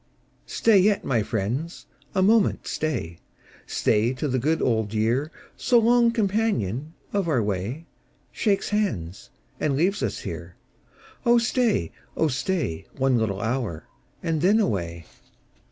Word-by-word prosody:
Stat 215 -4 +4
yet, 205 +1 +2
my 120 -4 +2
friends, 115 - -3 0.3
a 190 - +3
moment 215 +1 +3
stay 85 - -3 0.2
— - - -32 0.2
Stay 115 +4 +1
till 135 +2 -2
the 130 - +1
good 155 +6 +1
old 110 -3 0
year, 120 +8 +1 0.2
So 245 - +3
long 235 +1 +5
companion 195 - -1 0.2
of 200 -3 0
our 130 -8 +2
way, 105 - -3 0.5
Shakes 200 -3 0
hands, 90 - -2 0.3
and 145 -3 +1
leaves 185 +8 +1
ns - - -2
here. - - -7 0.7
Oh 240 -1 +5
stay, 235 - +1 0.3
oh 160 - +2
stay. 145 - -2
One 130 -2 +2
little 100 -3 -1
hour, 115 -9 -2 0.4
and 165 -3 0
then 200 +6 +4
away. 85 - -1
145 Hz, 135 wpm, -25 LUFS, -, 0.7 s, long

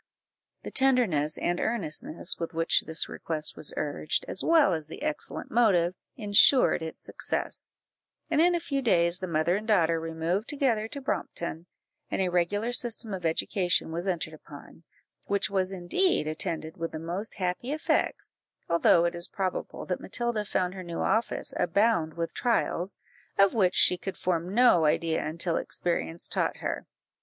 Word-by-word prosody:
The - - -6
tenderness 235 - +2
and 175 0 -1
earnestness 170 -6 -1
with 165 -1 -5
which 165 0 +2
this 160 0 0
request 155 -2 -3
was 155 - +2
urged, 150 +1 -1
as 185 - -2
well 320 - +5
as 155 -2 -3
the - - -9
excellent 305 0 -4
motive, 185 -7 +3 0.2
ensured 215 0 +5
its 160 0 -7
success; - - -2 0.5
and 300 - +2
in 350 +1 +4
a - - +1
few 280 -5 -2
days 170 -7 +3
the 185 - -4
mother 165 +1 +1
and 215 +1 -7
daughter 165 -6 +3
removed 165 +6 -2
together 255 -7 0
to 280 +4 -7
Brompton, 170 - -4 0.4
and - - -2
a 185 -1 +1
regular 200 +6 0
system 230 -3 -1
of 180 -3 -1
education 175 +1 +1
was 170 +3 -3
entered 165 -4 -2
upon, 155 +1 -13 0.4
which 200 -1 -1
was 190 -1 0
indeed 190 - +1
attended 160 +1 -3
with 165 0 -4
the - - -3
most 175 +7 -4
happy 185 +7 -2
effects, 310 +1 -1 0.3
although 170 0 +4
it 170 - 0
is 175 0 -3
probable 190 -2 -4
that 180 - -3
Matilda 235 0 -1
found 180 -2 -1
her 190 - -7
new 170 -1 -5
office 220 +4 0
abound 180 -4 +2
with 170 0 -3
trials, 210 -6 -1 0.4
of 195 0 +5
which 190 -5 +2
she 180 - +5
could 195 - -5
form 175 0 -1
no 210 -7 +5
idea 160 +1 +1
until 165 +2 -1
experience 170 -1 -2
taught - - -1
her. - - -4
180 Hz, 165 wpm, -28 LUFS, 165-220 Hz, 0.5 s, well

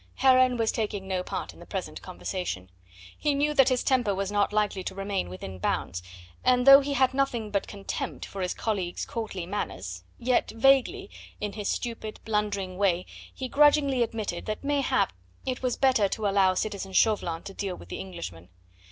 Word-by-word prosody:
Heron 255 -1 +5
was 225 -1 +2
taking 205 -3 -3
no 185 -1 0
part - - -5
in - - -17
the - - -11
present - - -5
conversation. 95 - -5 0.4
He 295 -2 0
knew 295 +2 +1
that 270 -2 +5
his 255 -1 +1
temper 245 -7 +2
was 195 +1 -2
not 205 0 +2
likely 210 -3 0
to - - -4
remain 195 - -2
within 95 +1 -7
bounds, 85 -1 -1 0.4
and 250 0 +4
though 275 0 +11
he 285 0 -2
had 260 0 +3
nothing 245 -6 0
but 200 -1 0
contempt 200 -1 -5
for 195 - -7
his 180 - -1
colleague's 190 -6 -2
courtly 215 -6 -4
manners, 205 +4 -4
yet 250 0 +1
vaguely 270 - +3 0.3
in 210 -1 -3
his 210 -2 -3
stupid, 225 -2 -4
blundering 205 -4 -1
way 185 -3 +2 0.3
he 260 - -5
grudgingly 285 -2 +4
admitted 220 -6 -2
that 215 +3 -3
mayhap 280 - +1 0.3
it 255 -1 -2
was 255 -2 0
better 255 -7 +4
to 220 +1 -3
allow 195 -2 +4
citizen 195 -1 -3
Chauvelin 180 -6 +2
to 195 - -8
deal 190 -2 -3
with - - -13
the - - -5
Englishman. 130 - -7
210 Hz, 180 wpm, -27 LUFS, 190-255 Hz, 0.4 s, though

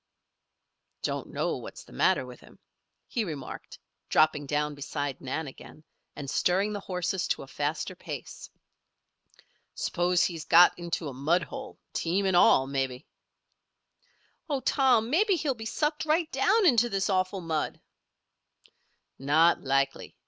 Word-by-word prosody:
"Don't - - -2
know - - -1
what's - - -9
the - - -17
matter - - +2
with - - -11
him," - - -18 0.5
he 235 - -1
remarked, 150 -9 -7 0.3
dropping 155 -2 +3
down 150 +1 0
beside 145 -1 -4
Nan 145 +5 -3
again, 145 +2 -12 0.3
and 140 - -7
stirring 185 +9 +1
the 205 - -3
horses 180 -1 -2
to - - -1
a - - -12
faster 150 +7 -3
pace. 150 -7 -8 1.3
"S'pose 175 0 +1
he's 165 -3 -2
got 175 +2 +7
into 170 -2 -3
a 140 - -5
mud 155 +8 +1
hold, 265 -2 -8 0.2
team 185 +4 0
and 190 -2 +2
all, 135 -6 +6
maybe." 135 -2 -3 1.4
"Oh, 280 -3 -1
Tom! 245 -3 +3
Maybe 395 +5 +3
he'll 300 -5 0
be 220 -2 -7
sucked 300 +5 -1
right 315 +1 +1
down 450 -3 +3
into 240 -7 +4
this 195 -2 0
awful 185 0 0
mud." 160 -2 -2 1.4
"Not 155 +5 +4
likely. 135 0 0
175 Hz, 140 wpm, -28 LUFS, 145-220 Hz, 1.4 s, got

